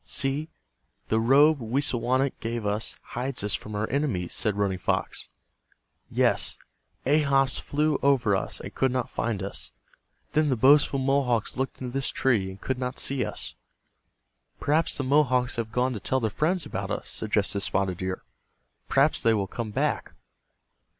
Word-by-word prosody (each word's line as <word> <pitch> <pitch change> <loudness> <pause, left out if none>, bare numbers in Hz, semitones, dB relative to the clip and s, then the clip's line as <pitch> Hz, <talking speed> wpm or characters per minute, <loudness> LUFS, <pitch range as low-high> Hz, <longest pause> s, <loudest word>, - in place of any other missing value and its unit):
"See, 140 +3 -1 0.6
the 110 - +2
robe 140 +6 +5
Wisawanik 130 +2 0
gave 115 -1 -3
us 105 +2 -2
hides 125 -1 -3
us 105 - +6
from 105 0 -4
our 105 +1 -1
enemies," 125 - -1
said 105 -2 0
Running 100 -3 0
Fox. - - -2 0.8
"Yes, - - +2 0.5
Ahas 135 -2 +3
flew 150 +1 0
over 125 -7 +3
us, 95 - -1
and - - -8
could 130 -1 +1
not 125 -1 -2
find 110 -4 -2
us. 70 -10 -4 0.6
Then 155 -1 +3
the 130 - +2
boastful 140 +3 +5
Mohawks 130 -4 +1
looked 130 +1 -3
into 125 -1 -5
this 135 0 0
tree, 110 -8 +1
and 95 +1 -10
could 130 +3 -3
not 125 0 -3
see 135 -2 +1
us." - - -4 1.1
"Perhaps 155 +3 +2
the 140 - -1
Mohawks 130 -3 +2
have 115 -1 -3
gone 125 +2 +1
to 110 - -5
tell 130 +6 0
their 110 -3 -1
friends 170 - 0
about - - -4
us," - - -3
suggested 105 -2 0
Spotted 95 -2 -1
Deer. 95 0 -4 0.7
"Perhaps 140 +3 +3
they 115 -1 +3
will 100 -2 0
come 110 +3 -5
back." 105 - -1
125 Hz, 160 wpm, -26 LUFS, 105-140 Hz, 1.1 s, us